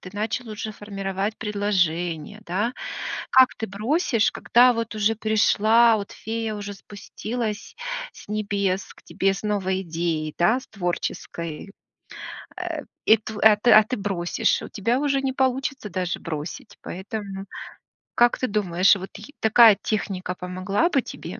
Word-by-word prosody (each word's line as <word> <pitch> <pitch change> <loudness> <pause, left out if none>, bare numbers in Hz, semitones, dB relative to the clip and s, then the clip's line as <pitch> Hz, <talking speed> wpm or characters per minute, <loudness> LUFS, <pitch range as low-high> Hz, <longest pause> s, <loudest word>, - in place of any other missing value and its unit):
ты 185 - -10
начал 220 +3 -3
уже 215 0 -5
формировать 200 0 -4
предложение, 185 -4 -1
да? 205 +7 -1 0.6
Как 260 -1 +6
ты 225 - -4
бросишь, 225 - +1
когда, 245 +1 +5
вот, 230 -1 -3
уже 215 +1 +1
пришла, 220 +1 +4
вот, 200 -2 -6
фея 225 0 -4
уже 205 -1 -6
спустилась 215 +2 -6 0.4
с - - -15
небес 200 -2 -1
к - - -20
тебе 195 0 0
с - - -7
новой 190 -3 0
идеей, 165 -3 -2
да, 220 +9 +3
с - - -16
творческой. 175 -2 -4 0.9
Э, - - -4 0.2
и 220 - +7
тв 215 -1 -8
а, 215 -1 +8
ты, 240 +3 +3
а, 215 - +9
ты 240 +4 -4
бросишь. 190 -4 0
У - - -8
тебя 230 +5 0
уже 280 -2 +1
не 265 -1 -1
получится 265 -2 -1
даже 180 -1 -2
бросить, 155 0 -6
поэтому, 195 0 -6 0.7
как 240 0 +4
ты 255 - 0
думаешь, 195 -3 +3
вот 190 0 -7
й 290 - -12
такая 220 -1 +7
техника 190 -4 -2
помогла 185 - -1
бы 275 -6 +2
тебе? - - -8
210 Hz, 150 wpm, -24 LUFS, 190-225 Hz, 0.9 s, а